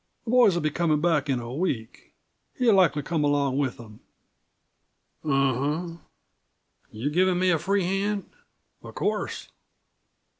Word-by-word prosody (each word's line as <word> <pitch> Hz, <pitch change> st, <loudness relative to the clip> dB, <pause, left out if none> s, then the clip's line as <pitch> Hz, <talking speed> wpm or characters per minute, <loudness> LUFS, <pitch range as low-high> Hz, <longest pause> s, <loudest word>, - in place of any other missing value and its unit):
"The 230 Hz, -, -3 dB
boys'll 220 Hz, -9 st, +4 dB
be 155 Hz, -, 0 dB
comin' 155 Hz, -2 st, +1 dB
back 150 Hz, -3 st, +1 dB
in 130 Hz, -2 st, +1 dB
a 120 Hz, +1 st, -7 dB
week. 130 Hz, -8 st, -4 dB, 0.4 s
He'll 245 Hz, -4 st, +3 dB
likely 175 Hz, -6 st, +3 dB
come 155 Hz, +1 st, -1 dB
along 140 Hz, -2 st, +1 dB
with 135 Hz, -3 st, -1 dB
them." 110 Hz, -3 st, -13 dB, 1.2 s
"U 150 Hz, -, -2 dB
um. 145 Hz, +6 st, 0 dB, 0.9 s
You're 125 Hz, +7 st, -3 dB
giving 185 Hz, +2 st, +2 dB
me 185 Hz, 0 st, +2 dB
a 165 Hz, -, +2 dB
free 195 Hz, +3 st, 0 dB
hand?" 195 Hz, +2 st, -1 dB, 0.5 s
"Of -, -, -12 dB
course." -, -, -3 dB
155 Hz, 140 wpm, -25 LUFS, 140-185 Hz, 1.2 s, boys'll